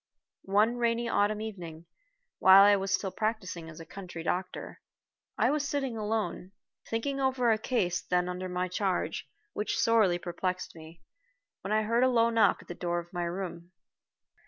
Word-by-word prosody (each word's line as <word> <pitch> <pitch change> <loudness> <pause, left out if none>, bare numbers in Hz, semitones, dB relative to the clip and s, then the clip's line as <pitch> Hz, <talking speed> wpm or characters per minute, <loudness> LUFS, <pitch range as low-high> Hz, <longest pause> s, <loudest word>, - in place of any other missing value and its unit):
One 215 +5 +3
rainy 235 0 0
autumn 210 -1 +1
evening, 170 -7 -7 0.5
while 190 +1 +9
I 205 0 +7
was 195 0 -2
still 195 -1 0
practicing 190 -7 -3
as 165 - -11
a 165 - -9
country 175 -2 -8
doctor, 180 +2 -4 0.6
I - - +3
was 290 -1 -1
sitting 270 -4 -2
alone, 210 -4 -3 0.4
thinking 275 +5 -2
over 260 -3 +2
a 215 - +2
case 185 -8 0
then 180 0 0
under 180 +1 -4
my 180 0 -1
charge, 185 +1 -2 0.2
which 210 - -2
sorely 215 -6 +3
perplexed 180 +1 -4
me, 160 +1 -13 0.6
when 195 - -5
I 215 0 +3
heard 230 +3 +2
a 260 - +5
low 235 -2 +3
knock 230 -1 +3
at - - -26
the - - -5
door 175 0 -2
of 175 +1 -6
my 175 -1 -2
room. 175 0 -6
195 Hz, 170 wpm, -29 LUFS, 180-225 Hz, 0.6 s, while